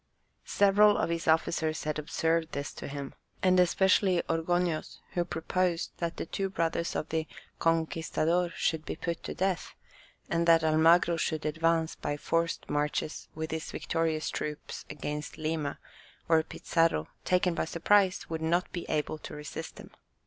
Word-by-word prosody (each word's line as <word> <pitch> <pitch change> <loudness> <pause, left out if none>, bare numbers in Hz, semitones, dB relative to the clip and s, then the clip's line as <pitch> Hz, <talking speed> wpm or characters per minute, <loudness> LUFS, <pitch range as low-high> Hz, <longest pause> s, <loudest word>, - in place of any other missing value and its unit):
Several 205 +1 +5
of - - 0
his 165 0 -2
officers 160 0 +1
had 155 0 -2
observed 160 +2 0
this 140 0 -4
to - - -7
him, 140 -1 -6 0.3
and 185 -1 +5
especially 185 0 +3
Orgoños, 165 0 -1
who 175 - 0
proposed 175 +1 -1
that 170 -1 -3
the - - -3
two 195 +3 -2
brothers 170 -2 -1
of 155 - -2
the 160 -1 -1 0.3
"conquistador" 165 +1 +1
should 160 -1 0
be - - -4
put 170 0 -3
to - - -6
death, 190 -3 -1 0.5
and 170 0 0
that 165 -1 +6
Almagro 165 +2 +5
should 155 -1 -1
advance 160 +1 +1
by 145 - -3
forced 165 +2 -1
marches 150 +1 -2
with 160 0 -4
his 160 0 -3
victorious 165 -1 -1
troops 150 0 -5
against 150 0 -5
Lima, 155 -2 -2 0.5
where 160 -1 +4
Pizarro, 165 - 0
taken 180 -1 +2
by - - -1
surprise, 190 +3 +2
would 160 -1 -4
not 170 +3 +1
be 175 - -5
able 155 0 -1
to - - -8
resist 150 0 -7
him. - - -11
165 Hz, 155 wpm, -30 LUFS, 155-175 Hz, 0.5 s, that